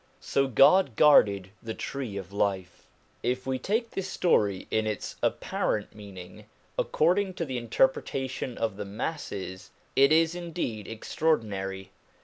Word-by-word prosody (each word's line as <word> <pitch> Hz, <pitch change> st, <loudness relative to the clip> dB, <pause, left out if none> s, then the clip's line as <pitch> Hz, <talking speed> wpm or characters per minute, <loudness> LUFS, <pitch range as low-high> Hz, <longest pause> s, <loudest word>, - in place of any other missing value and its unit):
So 135 Hz, 0 st, +1 dB
God 135 Hz, -, +5 dB
guarded 100 Hz, -11 st, +5 dB
the 110 Hz, -1 st, -5 dB
tree 130 Hz, -8 st, -5 dB
of 95 Hz, 0 st, -7 dB
life. 95 Hz, -3 st, -2 dB, 0.3 s
If 125 Hz, +1 st, -1 dB
we 130 Hz, -1 st, -1 dB
take 225 Hz, -, -1 dB
this 195 Hz, -1 st, -3 dB
story 100 Hz, -, +1 dB
in 110 Hz, 0 st, +1 dB
its 105 Hz, -2 st, -4 dB
apparent 105 Hz, -2 st, -1 dB
meaning, 95 Hz, -4 st, -11 dB, 0.3 s
accord 175 Hz, +5 st, +2 dB
ing 190 Hz, -2 st, -3 dB
to 165 Hz, -, -2 dB
the 130 Hz, -4 st, -3 dB
interpretation 130 Hz, +2 st, 0 dB
of 110 Hz, -3 st, -2 dB
the 105 Hz, -, -4 dB
masses, 100 Hz, -, -5 dB, 0.3 s
it 140 Hz, +2 st, +5 dB
is 165 Hz, +1 st, +4 dB
indeed 170 Hz, -, -4 dB
extraordinary. 100 Hz, -7 st, -2 dB
115 Hz, 135 wpm, -28 LUFS, 100-155 Hz, 0.3 s, God